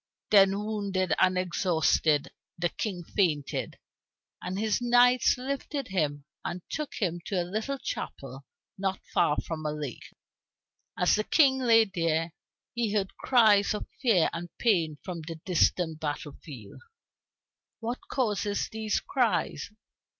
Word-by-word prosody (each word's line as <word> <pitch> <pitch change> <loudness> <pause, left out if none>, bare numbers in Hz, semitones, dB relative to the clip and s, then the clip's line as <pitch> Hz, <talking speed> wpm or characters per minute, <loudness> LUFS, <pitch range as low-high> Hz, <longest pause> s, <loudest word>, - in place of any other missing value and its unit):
Then, 195 -1 +6
wounded 200 -4 -1
and 185 0 +3
exhausted, 170 -4 +1 0.3
the 175 0 0
King 185 -3 -4
fainted, 160 -6 -1 0.6
and 185 +1 -4
his 215 +2 0
knights 245 +1 +4
lifted 275 +1 -4
him 145 -6 -1 0.2
and 175 0 -5
took 305 -2 -4
him 175 -4 -1
to 195 - 0
a 175 - -1
little 220 +9 -3
chapel 135 - -6 0.3
not 190 -1 -1
far 150 - +3
from 160 -2 -5
a 150 - -1
lake. 150 -5 -6 0.9
As 180 - +3
the 215 - +2
King 265 +1 +4
lay 230 -3 +5
there, 165 -4 -1 0.4
he 235 -3 -1
heard 195 -2 -1
cries 215 -5 +4
of - - -5 0.2
fear 220 - +3
and 175 +1 -5
pain 170 -10 +1
from 175 -3 -5
the 165 +1 -7
distant 170 -2 +1
battle 150 -1 -4
field. 125 -10 -11 1.0
"What 240 +2 -3
causes 210 -5 -1
these 220 -1 -1
cries?" 210 - 0
190 Hz, 135 wpm, -28 LUFS, 165-220 Hz, 1.0 s, Then